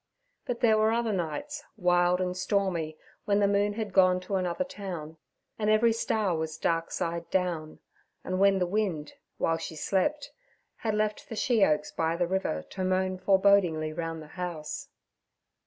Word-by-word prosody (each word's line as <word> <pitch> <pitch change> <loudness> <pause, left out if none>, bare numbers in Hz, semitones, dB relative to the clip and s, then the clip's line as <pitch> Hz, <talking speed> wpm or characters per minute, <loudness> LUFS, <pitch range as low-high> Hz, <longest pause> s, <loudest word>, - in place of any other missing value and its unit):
But 240 -1 -3
there 220 -2 +5
were 215 +1 +4
other 230 -1 0
nights, 180 - -3
wild 180 -1 +3
and 180 -1 -1
stormy, 185 -5 -1 0.3
when 200 -1 +2
the 200 - +4
moon 205 +1 +2
had 210 -2 -4
gone 185 -1 +5
to 185 +2 -7
another 180 +6 0
town 180 - -7 0.4
and 210 -1 +1
every 220 +2 +4
star 215 -5 0
was 160 -1 -3
dark 165 0 0
side 170 0 -3
down, 175 -4 -1 0.5
and 185 0 -2
when 195 0 +5
the 180 - +1
wind, 180 -6 -1 0.2
while 165 - +1
she 160 - -6
slept, 240 - 0 0.5
had 220 -2 -1
left 215 0 -1
the 225 - -5
she 225 -1 +2
oaks 150 -3 +2
by 165 0 0
the 175 +1 +1
river 175 - -1
to 190 - -3
moan 185 0 0
forebodingly 190 -5 +3
round 165 -1 -4
the - - -12
house. 165 -4 -4
185 Hz, 170 wpm, -28 LUFS, 165-205 Hz, 0.5 s, there